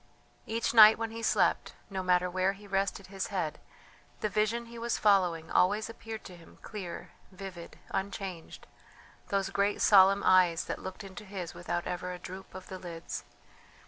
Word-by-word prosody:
Each 230 Hz, +1 st, -1 dB
night 220 Hz, -1 st, +9 dB
when 225 Hz, -1 st, -3 dB
he 230 Hz, 0 st, -6 dB
slept, -, -, +1 dB, 0.2 s
no 190 Hz, -1 st, -2 dB
matter 180 Hz, 0 st, +2 dB
where 185 Hz, +2 st, +1 dB
he 205 Hz, +1 st, -14 dB
rested 195 Hz, 0 st, -1 dB
his 195 Hz, 0 st, -4 dB
head, 180 Hz, -7 st, -3 dB, 0.6 s
the 215 Hz, -, 0 dB
vision 215 Hz, +3 st, 0 dB
he 235 Hz, 0 st, -10 dB
was 235 Hz, 0 st, -1 dB
following 180 Hz, -6 st, +2 dB
always 210 Hz, +5 st, +2 dB
appeared 225 Hz, -1 st, -8 dB
to 185 Hz, -, -10 dB
him 170 Hz, -1 st, -17 dB
clear, 195 Hz, -5 st, -7 dB, 0.2 s
vivid, 185 Hz, -3 st, -9 dB
unchanged 190 Hz, -3 st, -5 dB, 0.6 s
those 195 Hz, -1 st, -1 dB
great 200 Hz, +1 st, +1 dB
solemn 195 Hz, 0 st, +6 dB
eyes 180 Hz, -3 st, +4 dB
that -, -, -5 dB
looked 190 Hz, +2 st, -7 dB
into 195 Hz, +1 st, -9 dB
his 190 Hz, -4 st, -6 dB
without 175 Hz, 0 st, -3 dB
ever 180 Hz, 0 st, -3 dB
a 180 Hz, -, -5 dB
droop 185 Hz, +2 st, -9 dB
of 185 Hz, -1 st, -9 dB
the 185 Hz, -, -7 dB
lids. 170 Hz, -2 st, -6 dB
195 Hz, 170 wpm, -30 LUFS, 180-210 Hz, 0.6 s, night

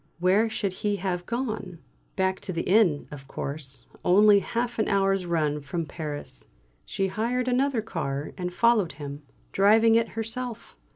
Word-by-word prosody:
Where 190 Hz, +6 st, +3 dB
should 200 Hz, -3 st, -2 dB
he 205 Hz, -1 st, +1 dB
have 180 Hz, -2 st, -3 dB
gone? 220 Hz, -7 st, -3 dB, 0.4 s
Back 190 Hz, -1 st, 0 dB
to -, -, -5 dB
the 165 Hz, -2 st, -2 dB
inn, 185 Hz, -8 st, +3 dB
of 135 Hz, -2 st, -10 dB
course, 135 Hz, -2 st, -6 dB, 0.2 s
only 205 Hz, +2 st, +6 dB
half 235 Hz, +3 st, -3 dB
an 215 Hz, -, +2 dB
hour's 195 Hz, -2 st, +1 dB
run 150 Hz, -3 st, 0 dB
from 160 Hz, +4 st, -3 dB
Paris. 150 Hz, -2 st, -6 dB, 0.4 s
She 195 Hz, -, -1 dB
hired 235 Hz, +6 st, -1 dB
another 255 Hz, -2 st, +1 dB
car 145 Hz, -8 st, -3 dB
and 180 Hz, -1 st, -4 dB
followed 220 Hz, -3 st, +3 dB
him, 145 Hz, 0 st, -7 dB, 0.3 s
driving 220 Hz, +3 st, +5 dB
it 230 Hz, 0 st, +3 dB
herself. 230 Hz, +1 st, -5 dB
195 Hz, 155 wpm, -26 LUFS, 165-225 Hz, 0.4 s, only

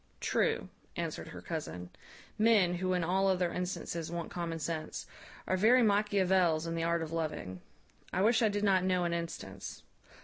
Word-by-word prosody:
"True," -, -, 0 dB, 0.3 s
answered -, -, -4 dB
her -, -, -9 dB
cousin; 90 Hz, 0 st, -5 dB, 0.4 s
"men, 210 Hz, -5 st, +4 dB
who 185 Hz, +1 st, 0 dB
in 180 Hz, -1 st, +1 dB
all 190 Hz, +3 st, +2 dB
other 180 Hz, -2 st, +1 dB
instances 170 Hz, -2 st, -3 dB
want 170 Hz, -1 st, -4 dB
common 170 Hz, -2 st, -3 dB
sense, 160 Hz, 0 st, -4 dB, 0.4 s
are 185 Hz, -, +1 dB
very 235 Hz, +6 st, +5 dB
Machiavels 190 Hz, -6 st, +3 dB
in 165 Hz, -, -3 dB
the 165 Hz, -, -1 dB
art 170 Hz, 0 st, +1 dB
of 160 Hz, -, -6 dB
loving. 155 Hz, -, -3 dB, 0.5 s
I 185 Hz, -, +1 dB
wish 225 Hz, +2 st, +4 dB
I 220 Hz, -, +4 dB
did 205 Hz, 0 st, -2 dB
not 190 Hz, -3 st, +4 dB
know 185 Hz, -1 st, +2 dB
an 170 Hz, -1 st, 0 dB
instance. 130 Hz, -, -6 dB
180 Hz, 170 wpm, -32 LUFS, 165-195 Hz, 0.5 s, very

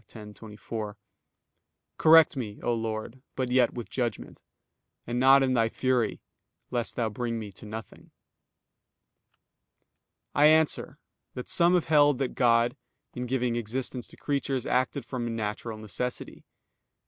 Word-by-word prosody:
10:24): 105 Hz, 0 st, -8 dB, 1.0 s
"Correct 160 Hz, -1 st, +7 dB
me, 110 Hz, -6 st, -5 dB
O 120 Hz, -, +1 dB
Lord, 115 Hz, +2 st, -4 dB
but 130 Hz, -2 st, -2 dB
yet 125 Hz, -2 st, +3 dB
with 120 Hz, -2 st, -6 dB
judgment; 120 Hz, -4 st, -4 dB, 0.6 s
and 120 Hz, +1 st, -2 dB
not 135 Hz, +1 st, +6 dB
in 130 Hz, -1 st, +1 dB
Thy 115 Hz, -2 st, +2 dB
fury, 125 Hz, -3 st, 0 dB, 0.5 s
lest 120 Hz, -2 st, -2 dB
Thou 115 Hz, -2 st, 0 dB
bring 115 Hz, +2 st, -3 dB
me 105 Hz, -2 st, -6 dB
to 100 Hz, -, -12 dB
nothing." 110 Hz, +1 st, -9 dB, 2.2 s
I 145 Hz, +1 st, +6 dB
answer 155 Hz, 0 st, +2 dB, 0.4 s
that, 125 Hz, -, -7 dB
Some 175 Hz, +1 st, +4 dB
have 175 Hz, -, +1 dB
held 145 Hz, -3 st, +4 dB
that 135 Hz, -1 st, -1 dB
God, 120 Hz, -1 st, +3 dB, 0.4 s
in 125 Hz, 0 st, -5 dB
giving 125 Hz, -1 st, 0 dB
existence 120 Hz, +2 st, -3 dB
to -, -, -16 dB
creatures, 140 Hz, -3 st, -2 dB
acted 130 Hz, +1 st, 0 dB
from 120 Hz, -3 st, -4 dB
natural 110 Hz, +1 st, -4 dB
necessity. 110 Hz, +4 st, -5 dB
120 Hz, 130 wpm, -27 LUFS, 115-130 Hz, 2.2 s, Correct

